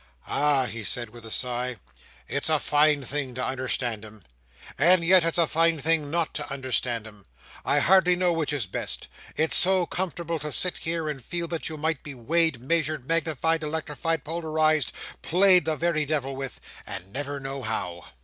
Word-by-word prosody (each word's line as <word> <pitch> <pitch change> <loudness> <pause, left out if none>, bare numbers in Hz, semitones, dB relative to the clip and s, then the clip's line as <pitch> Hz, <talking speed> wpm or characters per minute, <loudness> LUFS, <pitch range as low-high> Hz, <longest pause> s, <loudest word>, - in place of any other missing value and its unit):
"Ah!" 145 -2 +2
he 115 -2 -6
said, 120 +1 -1
with 120 0 -13
a - - -8
sigh, 125 +2 -1 0.5
"it's 140 +2 0
a 155 - +4
fine 150 -1 +2
thing 130 -1 -4
to 130 - -2
understand 125 -4 -2
'em. 110 -2 -13 0.5
And 175 +4 +5
yet 185 0 +6
it's 165 0 0
a 170 - +4
fine 165 +1 +2
thing 155 0 +1
not 165 +1 -1
to 150 -2 -5
understand 125 -4 -2
'em. 105 -5 -14 0.4
I - - +1
hardly 185 -1 +5
know 180 -1 +1
which 160 -3 -1
is 140 -7 -2
best. 95 - -1 0.3
It's 160 +1 +2
so 185 -1 +4
comfortable 170 -2 -3
to 150 0 -4
sit 180 +4 +5
here 165 -1 -2
and 140 -4 -5
feel 170 +6 -4
that 165 -2 -3
you 155 - -7
might 160 -1 -1
be 145 -2 -9
weighed, 160 +3 0
measured, 155 0 -1
magnified, 165 0 0
electrified, 160 +1 -3
polarized, 155 -3 0 0.3
played 180 -1 +5
the 160 -1 0
very 155 -1 0
devil 135 -3 -2
with: 135 -1 -6 0.3
and 95 +3 -7
never 145 +1 -4
know 135 0 -6
how." 90 -7 -4
150 Hz, 180 wpm, -26 LUFS, 130-165 Hz, 0.5 s, yet